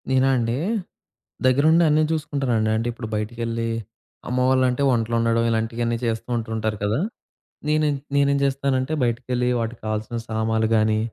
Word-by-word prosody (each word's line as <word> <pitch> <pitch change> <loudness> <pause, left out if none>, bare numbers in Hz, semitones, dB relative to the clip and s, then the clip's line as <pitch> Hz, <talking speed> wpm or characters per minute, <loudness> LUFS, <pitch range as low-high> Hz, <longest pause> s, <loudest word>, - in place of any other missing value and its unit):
నేనా 130 0 +3
అండి? 115 -1 0 0.9
దగ్గరుండి 155 +6 +5
అన్నీ 155 +1 +4
జూసుకుంటానండి. 135 -8 0
అంటే 115 +2 -1
ఇప్పుడు 115 -1 -6
బయటికెళ్ళి 115 +1 -2 0.6
అమ్మవాళ్ళంటే 130 +1 +2
వంటలు 115 -1 0
వండడం 115 0 +2
ఇలాంటివన్నీ 115 +1 -1
చేస్తూ 115 -1 -2
ఉంటూ 115 -1 -4
ఉంటారు 110 -1 -1
కదా! 105 +5 +1 0.7
నేనే 155 0 +2 0.3
నేనేం 140 0 +3
జేస్తానంటే 135 0 0
బయటికెళ్ళి 125 +1 0
వాటికి 115 +1 -4
కావాల్సిన 110 +2 -3
సామాన్లు 110 0 0
గానీ, 110 0 +2
120 Hz, 130 wpm, -23 LUFS, 110-130 Hz, 0.9 s, దగ్గరుండి